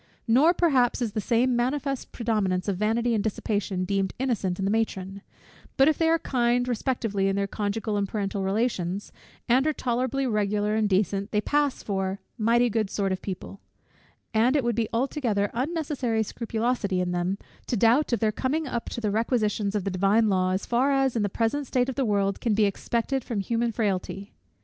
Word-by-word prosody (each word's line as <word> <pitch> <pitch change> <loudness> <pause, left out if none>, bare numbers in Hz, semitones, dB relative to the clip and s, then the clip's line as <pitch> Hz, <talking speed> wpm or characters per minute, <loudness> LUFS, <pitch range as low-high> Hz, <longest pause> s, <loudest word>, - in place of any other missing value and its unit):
Nor 285 +10 +5
perhaps 270 -9 +3
is 235 -4 -1
the 215 - -2
same 245 +4 +2
manifest 270 +2 -1
predominance 210 -6 -1
of 200 - 0
vanity 230 +4 +1
and 210 -3 +1
dissipation 205 -3 -2
deemed 195 0 -1
innocent 220 -9 -1
in 195 - -2
the 195 - +1
matron: 200 -3 -2 0.6
but 270 - +6
if 310 - +2
they 325 -1 +3
are 330 - +4
kind 245 -4 +1
respectively 225 -5 -1
in 195 - +1
their 200 0 0
conjugal 210 +1 -2
and 200 -1 -1
parental 200 -2 -2
relations, 195 -2 -1 0.4
and 260 +5 +3
are 310 - +2
tolerably 255 +1 -1
regular 210 -2 0
and 215 -1 +1
decent, 195 +1 +1
they 210 - +1
pass 290 +5 0
for 195 -1 -2 0.2
mighty 235 +2 +3
good 220 -3 0
sort 195 -1 -1
of 185 - -2
people; 195 0 -7 0.7
and 235 +5 +3
it 285 - +2
would 240 0 +1
be 225 -1 0
altogether 230 -5 0
unnecessary 265 -5 -1
scrupulosity 225 -3 -1
in 180 -1 -1
them 180 +2 -1 0.3
to 240 - 0
doubt 240 +8 +3
of 235 - 0
their 215 -1 +3
coming 285 +8 -1
up 240 -4 -3
to 235 - -5
the 210 -2 0
requisitions 215 -2 0
of 205 - 0
the 195 - -2
divine 200 +4 +3
law, 185 -1 +2
as 185 +1 -1
far 255 +4 +2
as 270 -2 +2
in 225 - +1
the 205 - 0
present 235 +7 -1
state 250 +1 +1
of - - -2
the 270 - 0
world 200 -2 0
can 225 -3 +1
be 215 0 +4
expected 235 +6 -1
from 230 -4 -3
human 230 +4 0
frailty. 200 -2 -2
220 Hz, 195 wpm, -26 LUFS, 200-245 Hz, 0.7 s, but